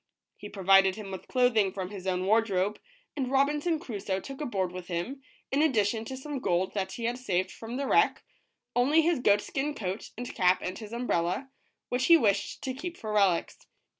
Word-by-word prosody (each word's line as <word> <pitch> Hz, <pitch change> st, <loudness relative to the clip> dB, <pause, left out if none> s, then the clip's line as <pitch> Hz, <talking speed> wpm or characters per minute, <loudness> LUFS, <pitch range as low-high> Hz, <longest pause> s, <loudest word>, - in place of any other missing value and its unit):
He 205 Hz, -, -9 dB
provided 195 Hz, -1 st, +4 dB
him 210 Hz, -2 st, -8 dB
with 190 Hz, -, -7 dB
clothing 240 Hz, -6 st, +3 dB
from 190 Hz, 0 st, -5 dB
Irs 190 Hz, -2 st, -7 dB
own 185 Hz, 0 st, 0 dB
wardrobe, 205 Hz, -2 st, +2 dB, 0.4 s
i^nd 265 Hz, -3 st, -2 dB
Robinson 295 Hz, +5 st, +2 dB
Crusoe 205 Hz, -, -3 dB
took 275 Hz, +7 st, -8 dB
aboard 195 Hz, -10 st, -1 dB
with 180 Hz, -1 st, -8 dB
him, 185 Hz, +11 st, -4 dB, 0.3 s
in 275 Hz, +2 st, +2 dB
addition 225 Hz, -6 st, +2 dB
to 260 Hz, +3 st, -6 dB
some 285 Hz, +1 st, -5 dB
gold 185 Hz, -4 st, 0 dB
that 190 Hz, -2 st, -2 dB
he 235 Hz, -, -6 dB
had 240 Hz, +2 st, -1 dB
saved 185 Hz, -7 st, -1 dB
from 230 Hz, +2 st, -7 dB
the 280 Hz, -, -2 dB
wreck, 420 Hz, +10 st, +3 dB, 0.5 s
only 285 Hz, +7 st, +4 dB
his 335 Hz, -3 st, +2 dB
goat 205 Hz, -4 st, +4 dB
skin 290 Hz, +6 st, -3 dB
coat 190 Hz, 0 st, -4 dB
and 245 Hz, +1 st, -5 dB
cap 180 Hz, 0 st, +3 dB
and 185 Hz, +1 st, -4 dB
his 215 Hz, -2 st, -9 dB
umbrella, 235 Hz, +1 st, -1 dB, 0.4 s
which 250 Hz, +1 st, 0 dB
he 335 Hz, -, +9 dB
wished 205 Hz, -8 st, 0 dB
to 260 Hz, -, -2 dB
keep 345 Hz, +6 st, -6 dB
for 215 Hz, -1 st, -5 dB
relics. 195 Hz, -5 st, +1 dB
220 Hz, 195 wpm, -29 LUFS, 190-265 Hz, 0.5 s, he